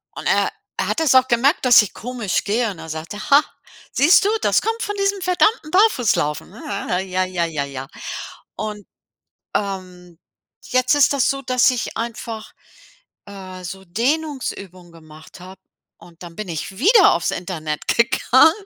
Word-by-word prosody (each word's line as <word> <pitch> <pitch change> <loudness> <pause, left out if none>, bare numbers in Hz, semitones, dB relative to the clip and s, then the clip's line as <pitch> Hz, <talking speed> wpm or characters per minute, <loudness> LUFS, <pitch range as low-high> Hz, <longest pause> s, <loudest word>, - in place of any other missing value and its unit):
und - - -5
er - - +2 0.3
er - - 0
hat - - -1
es 300 -5 +3
auch 260 0 +6
gemerkt, 260 +6 +2
dass 245 -2 +8
ich 210 - -5
komisch 235 -5 -3
gehe, 225 +3 0
und 190 - -11
dann 160 - -10
sagt 160 +3 -6
er: 205 - -7
„Ha, 285 +1 +8 0.5
siehst 320 +7 +5
du, - - +3
das - - +3
kommt 455 +1 -2
von 415 - -3
diesem 395 0 0
verdammten 360 -1 +1
Barfußlaufen, 245 - +2
ne?“ 215 - -13 0.5
Ja, 185 0 -1
ja, 180 -2 -1
ja, 155 -4 -3
ja. 135 -1 -7 0.7
Und, 210 -2 -6 0.7
ähm, 180 -4 -5 0.5
jetzt 255 +1 +2
ist 290 -2 +4
das 275 -3 +2
so, 275 0 -5
dass 255 -1 +3
ich 245 -3 -4
einfach, 230 -1 -6 0.7
äh, 185 -2 -10
so 190 +2 -7
Dehnungsübungen 230 - -3
gemacht 160 +1 -15
habe 185 +1 -12 0.4
und 170 0 -16
dann 170 -1 -11
bin 210 -2 -6
ich 170 +3 -5
wieder 400 - +6
auf's 170 - -1
Internet 155 -4 -5
gegangen 250 +5 +4
210 Hz, 165 wpm, -20 LUFS, 180-265 Hz, 0.7 s, dass